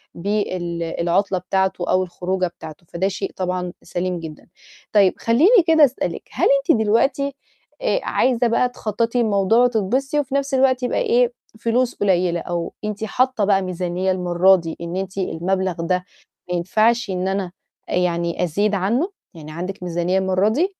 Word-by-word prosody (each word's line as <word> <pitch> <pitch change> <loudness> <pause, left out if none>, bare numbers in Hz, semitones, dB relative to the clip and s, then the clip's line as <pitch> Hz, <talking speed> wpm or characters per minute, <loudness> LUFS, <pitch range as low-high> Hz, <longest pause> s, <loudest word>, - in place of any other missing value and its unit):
بال 180 -3 -2
العُطلة 175 +4 0
بتاعته 190 -1 -1
أو 185 0 +3
الخروجة 185 +1 -2
بتاعته، 160 -1 -11
فده 185 +3 -1
شيء 195 0 -4
طبعًا 180 -1 -3
سَليم 180 0 -3
جدًا. 155 -2 -10 0.5
طيب 200 -3 +5
خلّيني 335 - +4
كده 320 -2 +7
أسألِك، 265 - -3
هل - - +2 0.2
أنتِ - - +6
دلوقتي 265 +6 +1 0.5
آآ - - +1
عايزة 245 -1 +1
بقى 240 +2 +2
تخطّطي 230 +1 -1
الموضوع 210 +1 +2
وتتبسطي 250 +5 +1
وفي 275 -1 -2
نَفْس 280 0 -1
الوقت 260 -1 +3
يبقى 245 - 0
إيه، 485 +1 +2 0.3
فلوس 240 +2 0
قُليّلة 180 -3 +1
أو 170 -1 -4
أنتِ 210 0 -4
حاطّة 250 0 +1
بقى 195 -1 +3
ميزانية 185 +1 -2
المرادي 180 -1 +2
إن 170 +1 -5
أنتِ 195 0 -5
المَبلغ 185 +1 -1
ده 180 +2 -1 0.4
ما 180 - -1
ينفعش 220 +6 +1
إن 185 0 -2
أنا 190 -2 -2 0.4
آآ - - -1
يعني 170 -1 0
أزيد 200 +5 0
عنّه؟ 235 - 0 0.2
يعني 155 -2 -10
عندِك 180 +3 -6
ميزانية 175 +2 0
المرة 190 +2 +2
دي؟ 325 - +1
190 Hz, 155 wpm, -21 LUFS, 180-235 Hz, 0.5 s, كده